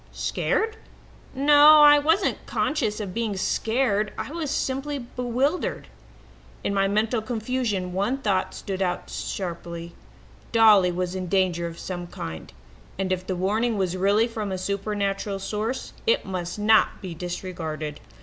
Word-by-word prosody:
Scared? 445 0 -1 0.6
No, 295 +2 +7
I 295 0 +8
wasn't 325 +7 +1
conscious 220 -9 -1
of 200 -4 -5
being 225 -3 -2
scared. 215 +1 0
I - - -5
was 320 -3 -3
simply 275 +1 -2
bewildered. 250 +5 -2 0.7
"In 200 - -1
my 195 0 +2
mental 215 +3 +1
confusion 220 -5 -2
one 200 +8 0
thought 200 -8 -1
stood 195 -1 -5
out 180 -2 -2
sharply 170 -2 -5 0.6
Dolly 215 -5 +6
was 180 0 -2
in 185 -1 -4
danger 180 -2 +1
of 165 0 -8
some 175 -1 -5
kind, 80 - -7 0.5
and 190 -1 -2
if 185 0 -5
the 185 - -1
warning 215 +5 0
was 185 -2 0
really 200 +5 +3
from 215 -4 -4
a 190 - -2
supernatural 200 +1 -2
source, 215 +6 -3
it 470 +2 +3
must 180 -1 -4
not 215 +1 +3
be 185 -4 -6
disregarded. 165 -3 -5
200 Hz, 140 wpm, -25 LUFS, 185-245 Hz, 0.7 s, I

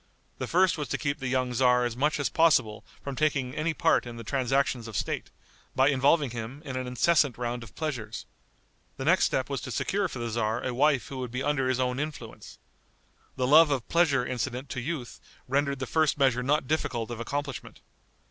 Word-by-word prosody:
The - - -3
first 180 -1 +3
was 145 - -3
to - - -2
keep 140 -1 -2
the 130 - -3
young 130 -1 0
tzar 125 0 +3
as 120 -1 -3
much 150 +4 +1
as 140 - +1
possible 130 -8 +2 0.2
from 140 -1 -5
taking 140 -4 0
any 155 +2 -1
part 125 - +2
in 120 -1 -8
the 115 - -7
transactions 130 -1 0
of 110 -5 -5
state, - - -3 0.5
by 135 +2 +4
involving 140 0 +3
him 120 +5 -7
in 130 - -5
an 130 0 -3
incessant 140 +2 +2
round 120 0 -3
of 115 -3 -12
pleasures. 140 -9 -4 0.7
The - - -4
next - - +4
step - - 0
was - - -3
to - - -7
secure - - 0
for - - -8
the 120 -1 -3
tzar 110 +1 -1
a 125 - -2
wife 140 +1 +2
who 135 - -6
would 125 -1 -4
be 125 +2 -3
under 135 -2 +1
his 130 -1 0
own 125 0 0
influence. 150 0 -7 0.8
The 130 - 0
love 155 +4 +7
of 135 -4 -1
pleasure 145 -7 +3
incident 130 +2 -3
to 130 - -4
youth 135 -3 -5 0.3
rendered 140 +1 0
the 130 - -3
first 155 +1 +1
measure 130 -3 +3
not 145 +3 +1
difficult 120 -6 -1
of 120 - -5
accomplishment. 140 +3 -5
130 Hz, 205 wpm, -28 LUFS, 125-145 Hz, 0.8 s, love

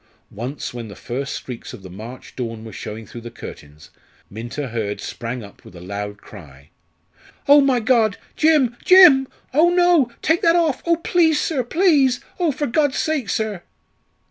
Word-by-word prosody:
Once 125 +7 -6
when 120 -2 -7
the 100 - -10
first 135 +3 -5
streaks 125 -3 -7
of 95 - -11
the - - -9
March 115 +7 -10
dawn 115 -3 -5
were 110 - -10
showing 110 +1 -7
through 120 +4 -10
the 120 - -8
curtains 75 -9 -12 0.4
Minta 120 +6 -6
Hurd 110 -3 -3
sprang 120 0 -6
up 100 - -15
with - - -15
a - - -10
loud 100 +3 -6
cry: 75 -10 -15 0.8
"Oh, 285 +1 +8
my 270 -3 +2
God! 220 -3 +2 0.2
Jim, 300 -7 +3
Jim! 345 -8 +7 0.3
Oh, 320 +5 +5
no! 350 -7 +3
take 320 +2 +2
that 335 0 +4
off. 325 -6 +1
Oh, 335 - +4
please, 330 -2 +2
sir, 280 -6 -1
please! 280 -3 +3 0.2
Oh, 345 -4 +2
for 290 +2 -3
God's 285 +2 +1
sake, 300 -9 -1
sir!" 215 -4 -2
215 Hz, 170 wpm, -21 LUFS, -, 0.8 s, Oh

